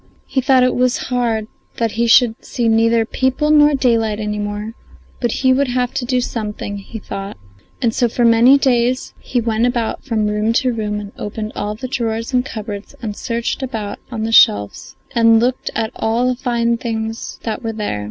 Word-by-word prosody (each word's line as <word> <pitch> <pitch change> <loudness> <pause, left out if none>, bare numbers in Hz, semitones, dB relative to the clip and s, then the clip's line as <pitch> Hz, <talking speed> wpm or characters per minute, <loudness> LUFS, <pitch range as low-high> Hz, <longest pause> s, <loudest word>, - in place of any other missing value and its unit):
He 265 - -1
thought 260 0 +4
it 255 - +3
was 250 0 +2 0.2
hard 230 -3 0 0.3
that 230 -2 0
he 235 +2 0
should 230 -1 +4
see 240 -2 -2
neither 225 0 +3
people 260 +6 0
nor 295 -1 +6
daylight 225 -5 +1
any 210 -1 -3
more; 205 +1 -4 0.5
but 240 -2 0
he 260 0 +5
would 275 +1 +1
have 250 0 -1
to 245 - -2
do 250 0 +1
something, 210 -3 -4
he 200 +3 -9
thought, 195 -2 -7 0.5
and 230 -2 +2
so 240 0 +1
for 240 +1 +1
many 235 +4 +6
days 255 -2 +1
he 250 - -2
went 230 0 +1
about 240 -2 -2
from 225 -5 -1
room 210 +2 0
to 255 +1 +1
room 210 -2 -2
and 205 -1 -8
opened 215 +1 -5
all 210 +1 -3
the 255 +4 -6
drawers 230 -1 -3
and 250 0 +3
cupboards 210 -5 -7
and 210 -2 -3
searched 235 +4 -3
about 225 -6 -4
on 225 -3 -4
the 225 - -2
shelves 100 - +3 0.2
and 230 -2 +5
looked 250 +2 0
at 220 -1 -1
all 230 +3 +1
the 255 - +1
fine 235 -2 +1
things 225 -1 -4
that 220 -2 -3
were 225 -2 -3
there. 210 - -3
230 Hz, 195 wpm, -18 LUFS, 220-250 Hz, 0.5 s, nor